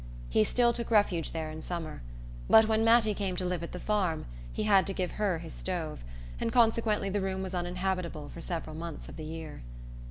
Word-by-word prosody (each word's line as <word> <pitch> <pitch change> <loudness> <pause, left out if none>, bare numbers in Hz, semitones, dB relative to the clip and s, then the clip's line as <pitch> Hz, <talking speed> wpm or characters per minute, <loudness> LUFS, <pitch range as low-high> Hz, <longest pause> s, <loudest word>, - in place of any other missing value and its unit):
He 110 - +4
still 240 - +3
took 235 -1 -2
refuge 205 -7 +3
there 160 -1 -3
in 155 0 -7
summer, 165 - -5 0.5
but 220 0 +8
when 220 0 +2
Mattie 225 -1 +5
came 195 -2 -2
to 180 - -2
live 180 -2 -1
at 170 - -5
the 180 - -6
farm 185 -6 0 0.3
he - - -2
had 200 -3 +5
to 195 - -1
give 180 -1 -1
her 200 -5 0
his 165 0 -8
stove, 165 - -4 0.4
and - - -1
consequently 225 -4 +3
the 205 +1 0
room 190 0 -2
was 190 0 -5
uninhabitable 180 -3 -2
for 170 - -9
several 165 -3 -4
months 165 -1 -6
of - - -9
the 155 - -7
year. 160 - -7
185 Hz, 210 wpm, -30 LUFS, 165-210 Hz, 0.5 s, but